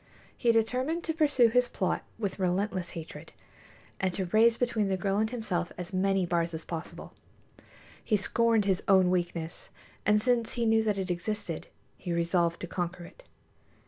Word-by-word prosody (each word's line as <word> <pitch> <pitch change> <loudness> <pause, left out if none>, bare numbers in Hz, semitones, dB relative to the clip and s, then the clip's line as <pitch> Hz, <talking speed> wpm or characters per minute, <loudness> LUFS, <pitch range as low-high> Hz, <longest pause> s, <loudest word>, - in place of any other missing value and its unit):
He 235 - +3
determined 255 +9 0
to 320 - -1
pursue 290 -7 +4
his 250 +2 +2
plot 185 -2 -1 0.2
with 200 -3 -3
relentless 185 -1 -1
hatred, 165 -1 -9 0.7
and 190 -1 +1
to 190 - -1
raise 225 +5 +4
between 235 -4 0
the 190 -1 0
girl 195 +2 0
and 220 +1 +1
himself 195 -8 -2
as 180 +1 -6
many 195 0 +2
bars 170 -1 0
as 160 - -6
possible. 165 -1 -7 0.9
He 215 - +2
scorned 225 +1 +2
his 190 -2 +1
own 190 -2 +5
weakness, 175 -2 -3 0.3
and 210 +1 +4
since 235 0 +1
he 235 -1 -1
knew 225 0 +4
that 210 -2 +1
it 190 -1 -2
existed, 175 -1 -3 0.3
he 175 - -4
resolved 170 0 +1
to 175 - -4
conquer 175 0 -4
it. 335 - -14
195 Hz, 170 wpm, -29 LUFS, 175-225 Hz, 0.9 s, own